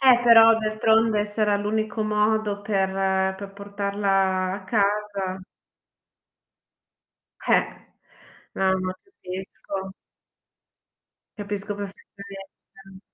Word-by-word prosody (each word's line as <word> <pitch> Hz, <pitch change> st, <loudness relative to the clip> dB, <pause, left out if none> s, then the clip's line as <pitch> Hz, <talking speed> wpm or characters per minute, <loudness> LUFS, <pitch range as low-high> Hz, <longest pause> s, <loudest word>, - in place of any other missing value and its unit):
Eh, 255 Hz, -2 st, +6 dB
però 225 Hz, -1 st, +8 dB
d'altronde 220 Hz, 0 st, +2 dB
se 205 Hz, +1 st, -3 dB
era 205 Hz, -1 st, +3 dB
l'unico 215 Hz, +1 st, -2 dB
modo 210 Hz, -1 st, 0 dB
per 190 Hz, -1 st, 0 dB
per 200 Hz, 0 st, -9 dB
portarla 200 Hz, -2 st, -1 dB
a 195 Hz, -1 st, -6 dB
casa. 200 Hz, -2 st, -1 dB, 2.1 s
Eh! -, -, +2 dB, 1.0 s
Eh, 190 Hz, 0 st, +2 dB
ma 185 Hz, 0 st, -2 dB
capisco. 190 Hz, -, -7 dB, 1.5 s
Capisco 205 Hz, 0 st, -4 dB
perfettamente. 195 Hz, -1 st, -11 dB
200 Hz, 80 wpm, -24 LUFS, 195-215 Hz, 2.1 s, però